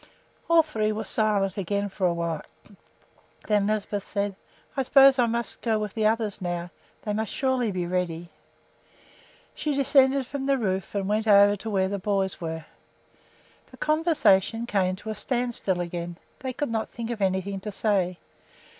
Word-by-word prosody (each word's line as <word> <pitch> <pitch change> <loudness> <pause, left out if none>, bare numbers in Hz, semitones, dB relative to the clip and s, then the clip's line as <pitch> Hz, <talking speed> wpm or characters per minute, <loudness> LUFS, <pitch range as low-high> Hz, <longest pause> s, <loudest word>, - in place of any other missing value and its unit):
All 335 -1 +6
three 220 -8 -1
were 215 +1 -3
silent 205 -2 +1
again 200 +2 -1
for 190 -1 -1
a 175 - +1
while. 170 -2 -2 1.0
Then 205 -2 +2
Lisbeth 210 -1 -1
said: 200 -1 -2 0.4
"I 270 - +1
suppose 270 0 +6
I 240 - +4
must 235 +1 -1
go 225 -2 +1
with 210 -2 -3
the 215 -1 +2
others 215 -2 -1
now. 175 -1 -3 0.3
They 210 - -2
surely 260 +1 0
must 200 - -3
be 180 -1 -1
ready." 175 -1 -2 1.2
She 300 -2 -2
descended 270 -1 +4
from 270 +1 -4
the 275 -1 +3
roof 195 -4 -2
and 195 -1 -1
went 215 +2 0
over 205 0 +7
to 220 +3 -6
where 190 -2 +1
the 200 +1 -3
boys 195 -2 -1
were. 160 -1 -4 1.0
The - - -15
conversation 295 - +2
came 190 -5 +1
to 215 +3 -6
a - - -4
standstill 240 -6 -1
again; 175 0 -5 0.2
they 260 -1 -4
could 255 0 -3
not 220 -1 -2
think 235 0 -5
of 225 -3 -5
anything 190 +1 0
to 210 +2 -6
say. 190 -4 0
210 Hz, 170 wpm, -26 LUFS, 190-235 Hz, 1.2 s, over